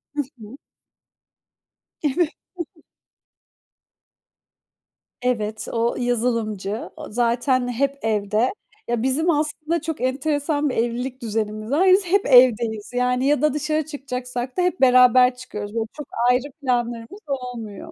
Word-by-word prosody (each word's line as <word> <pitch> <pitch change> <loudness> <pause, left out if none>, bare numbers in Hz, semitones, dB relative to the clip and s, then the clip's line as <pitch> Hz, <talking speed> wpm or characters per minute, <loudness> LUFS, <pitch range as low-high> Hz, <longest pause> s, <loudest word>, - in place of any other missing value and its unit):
Hı 290 - +1 0.2
hı. 220 +6 -11 1.4
Evet. 310 +2 +1 2.9
Evet, 220 -4 -1
o 230 +1 0
yazılımcı. 230 -4 -1
O - - -8
zaten 245 +3 +1
hep 275 +3 -1
evde. 215 - +1 0.3
Ya, 235 0 -1
bizim 290 +6 +1
aslında 305 +1 0
çok 320 -1 -4
enteresan 290 +3 0
bir - - -3
evlilik 245 +3 -2
düzenimiz 215 0 -3
var. 340 +7 +3
Biz 385 +1 +5
hep 390 +3 +2
evdeyiz. 235 -4 +4
Yani, 250 +1 +1
ya 290 -2 +3
da 305 -2 +3
dışarı 305 +1 -1
çıkacaksak 250 -3 -5
da - - +3
hep 360 -3 0
beraber 250 0 +6
çıkıyoruz 210 -4 -7
ve - - +1 0.2
çok 295 -3 -7 0.2
ayrı 255 +3 +1
planlarımız 240 - -2
olmuyor. 245 -7 -6
250 Hz, 120 wpm, -22 LUFS, 230-290 Hz, 2.9 s, beraber